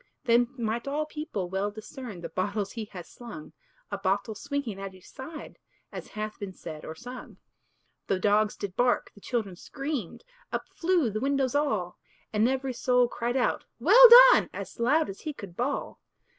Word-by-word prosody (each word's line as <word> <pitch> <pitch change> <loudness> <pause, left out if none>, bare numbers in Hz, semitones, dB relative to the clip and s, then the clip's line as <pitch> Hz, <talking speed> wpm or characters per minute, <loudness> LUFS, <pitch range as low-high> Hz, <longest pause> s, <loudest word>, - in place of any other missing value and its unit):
Then 240 0 +4
might 235 +1 -2
all 295 +2 -1
people 300 - -5
well 190 +3 -1
discern 215 -1 -9
The 165 - -6
bottles 200 +3 -2
he 225 -3 -5
has 180 -5 -10
slung; 160 -11 -10 0.4
A 200 - -3
bottle 200 +3 0
swinging 280 -4 -4
at 195 -1 -6
each 185 - -17
side, 300 +4 -9 0.3
As - - -7
hath 215 0 -4
been 200 -2 -6
said 155 -4 -9
or 160 - -7
sung. 245 +8 -10 0.7
The 195 - +1
dogs 210 +2 +2
did 195 -3 -5
bark, 245 0 +1
the 205 - -17
children 215 -7 -2
screamed 275 - -5 0.3
Up - - -2
flew 335 -9 +1
the 215 - -2
windows 275 -2 +1
all; 215 -12 -1 0.3
And 220 +3 +3
every 265 0 -1
soul 250 0 +3
cried 240 +1 -2
out, 250 - 0
"Well - - +9 0.2
done!" - - +3
As - - -8
loud 295 +7 +3
as 195 - -8
he 305 - -4
could 200 -10 -10
bawl. 255 +6 -3
230 Hz, 175 wpm, -28 LUFS, 195-265 Hz, 0.7 s, Well